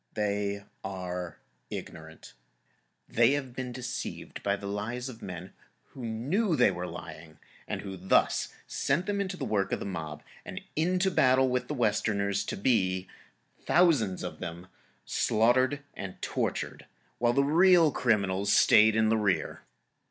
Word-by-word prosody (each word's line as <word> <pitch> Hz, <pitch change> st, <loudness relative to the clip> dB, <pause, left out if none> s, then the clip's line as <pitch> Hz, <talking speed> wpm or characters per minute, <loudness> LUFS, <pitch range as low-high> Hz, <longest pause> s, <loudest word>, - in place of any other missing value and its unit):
They 100 Hz, -1 st, -1 dB, 0.2 s
are 90 Hz, -2 st, -5 dB, 0.3 s
ignorant. 80 Hz, 0 st, -9 dB, 0.7 s
They 135 Hz, -, +4 dB
have 135 Hz, -4 st, -3 dB
been 130 Hz, -1 st, -4 dB
deceived 125 Hz, 0 st, -6 dB
by 100 Hz, 0 st, +1 dB
the 100 Hz, -, -9 dB
lies 115 Hz, +6 st, -3 dB
of 115 Hz, -2 st, -11 dB
men 90 Hz, 0 st, -7 dB, 0.4 s
who 130 Hz, -, -10 dB
knew 145 Hz, -, 0 dB
they 105 Hz, -, +4 dB
were 90 Hz, 0 st, -4 dB
lying, 80 Hz, -2 st, -9 dB, 0.3 s
and -, -, -3 dB
who 95 Hz, -1 st, -6 dB
thus 95 Hz, +2 st, +2 dB
sent 150 Hz, +7 st, 0 dB
them 200 Hz, 0 st, -1 dB
into 190 Hz, -1 st, -3 dB
the -, -, -3 dB
work 100 Hz, -2 st, 0 dB
of -, -, 0 dB
the -, -, -5 dB
mob 80 Hz, -6 st, -5 dB, 0.2 s
and -, -, -6 dB, 0.2 s
into 180 Hz, +4 st, +2 dB
battle 130 Hz, -4 st, +4 dB
with 125 Hz, 0 st, -1 dB
the 150 Hz, -, -3 dB
Westerners, 100 Hz, -4 st, +1 dB
to -, -, -4 dB
be—thousands 105 Hz, -, 0 dB
of -, -, -6 dB
them—slaughtered 115 Hz, +9 st, 0 dB
and 100 Hz, -2 st, -7 dB
tortured, -, -, -3 dB, 0.3 s
while 120 Hz, 0 st, +3 dB
the 140 Hz, -, +3 dB
real 165 Hz, +2 st, +5 dB
criminals 100 Hz, -5 st, +1 dB
stayed 110 Hz, 0 st, +6 dB
in 110 Hz, -1 st, +3 dB
the 115 Hz, -, +3 dB
rear. 105 Hz, -3 st, 0 dB
110 Hz, 145 wpm, -29 LUFS, 95-130 Hz, 0.7 s, stayed